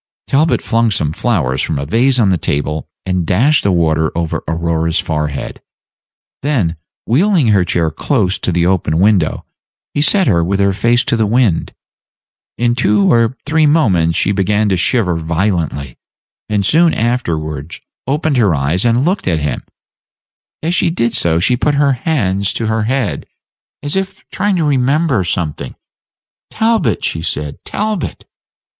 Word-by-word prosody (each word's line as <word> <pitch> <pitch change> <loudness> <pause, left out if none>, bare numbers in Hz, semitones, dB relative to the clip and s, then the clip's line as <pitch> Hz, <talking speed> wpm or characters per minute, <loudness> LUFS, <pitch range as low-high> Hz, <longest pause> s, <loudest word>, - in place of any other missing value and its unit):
Talbot 155 +4 +1
flung 115 -1 +1
some 80 -7 -1
flowers 75 - 0
from - - -2
a 70 - -3
vase 125 - +2
on 110 -5 +3
the 95 - +3
table, 75 +2 -2 0.2
and 90 -2 0
dashed 125 - +2
the 100 - +1
water 80 -2 +1
over 85 -2 -2
Aurora's 80 +1 -1
forehead; 75 -3 -3 0.8
then, 120 - 0 0.3
wheeling 160 - +2
her 100 -3 +4
chair 85 -2 0
close 100 - 0
to - - -1
the 85 0 +1
open 85 -4 +1
window, 95 -3 +2 0.5
he 145 - 0
set 190 +6 +3
her 85 - +2
with 95 +3 -1
her 100 0 +2
face 120 +5 +1
to - - +1
the 110 -2 +1
wind. 110 -6 +1 0.8
In 120 0 +1
two 105 -4 +2
or 115 +2 +2
three 155 +1 +2
moments 95 - +2
she 100 - +2
began 105 +2 +1
to 95 - +2
shiver 90 0 +1
violently, 80 - -2 0.5
and 105 -2 0
soon 165 - +3
afterward 80 - -2 0.3
opened 145 +1 0
her 105 -9 +3
eyes 75 +6 0
and 120 +3 +2
looked 185 +4 -1
at 85 -3 +1
him; 75 -1 -2 1.0
as 165 +2 0
she 175 - +2
did 120 -9 -1
so, 85 -6 +1
she 115 +8 +2
put 145 +4 0
her 140 -1 +3
hands 105 - -1
to 115 - -3
her 110 -1 0
head, 130 -1 -2 0.6
as 145 +3 -2
if 195 0 -4
trying 200 0 0
to 170 - 0
remember 140 - +1
something. 85 -7 -3 0.7
"Talbot!" 220 - 0
she 80 - -2
said, 75 -2 -4
"Talbot!" 210 -3 -3
105 Hz, 160 wpm, -15 LUFS, 85-135 Hz, 1.0 s, her